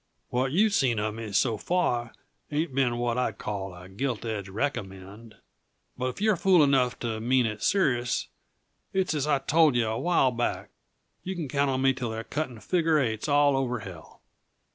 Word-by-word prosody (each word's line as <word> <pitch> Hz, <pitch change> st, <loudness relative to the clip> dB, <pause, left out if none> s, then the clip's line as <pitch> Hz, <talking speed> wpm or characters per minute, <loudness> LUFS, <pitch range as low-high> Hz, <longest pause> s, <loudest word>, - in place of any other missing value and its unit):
"What 130 Hz, +2 st, 0 dB
you've 205 Hz, +6 st, +3 dB
seen 125 Hz, -, +2 dB
uh 105 Hz, +1 st, -1 dB
me, 110 Hz, -1 st, -7 dB
so 110 Hz, +2 st, +2 dB
far, 120 Hz, -, 0 dB, 0.4 s
ain't 155 Hz, 0 st, -1 dB
been 125 Hz, -3 st, +1 dB
what 120 Hz, 0 st, 0 dB
I'd 115 Hz, -5 st, -1 dB
call 95 Hz, -3 st, -5 dB
a 90 Hz, +1 st, -11 dB
gilt 115 Hz, +4 st, -3 dB
edge 105 Hz, -4 st, -4 dB
recommend. 100 Hz, -2 st, -5 dB, 0.6 s
But 130 Hz, 0 st, -2 dB
if 130 Hz, -, -5 dB
you're 215 Hz, 0 st, +3 dB
fool 180 Hz, -2 st, +4 dB
enough 130 Hz, -3 st, +2 dB
to 115 Hz, -2 st, -2 dB
mean 125 Hz, +2 st, +2 dB
it 105 Hz, -1 st, -4 dB
serious, 125 Hz, -11 st, +1 dB, 0.7 s
it's 190 Hz, -3 st, +1 dB
as 150 Hz, -1 st, -1 dB
I 150 Hz, -, +3 dB
told 150 Hz, +1 st, +3 dB
yuh 120 Hz, -2 st, +2 dB
a 110 Hz, +1 st, -2 dB
while 165 Hz, -7 st, +3 dB
back: 120 Hz, 0 st, -2 dB, 0.5 s
Yuh 190 Hz, +1 st, -5 dB
can 165 Hz, -4 st, -4 dB
count 140 Hz, +1 st, +1 dB
on 130 Hz, 0 st, 0 dB
me 135 Hz, 0 st, +4 dB
till 125 Hz, -3 st, -4 dB
they're 110 Hz, 0 st, -4 dB
cutting 125 Hz, -3 st, -4 dB
figure 165 Hz, -3 st, +2 dB
eights 115 Hz, -2 st, -1 dB
all 145 Hz, -1 st, +4 dB
over 125 Hz, -3 st, -1 dB
hell." 90 Hz, -5 st, -11 dB
125 Hz, 185 wpm, -27 LUFS, 110-145 Hz, 0.7 s, fool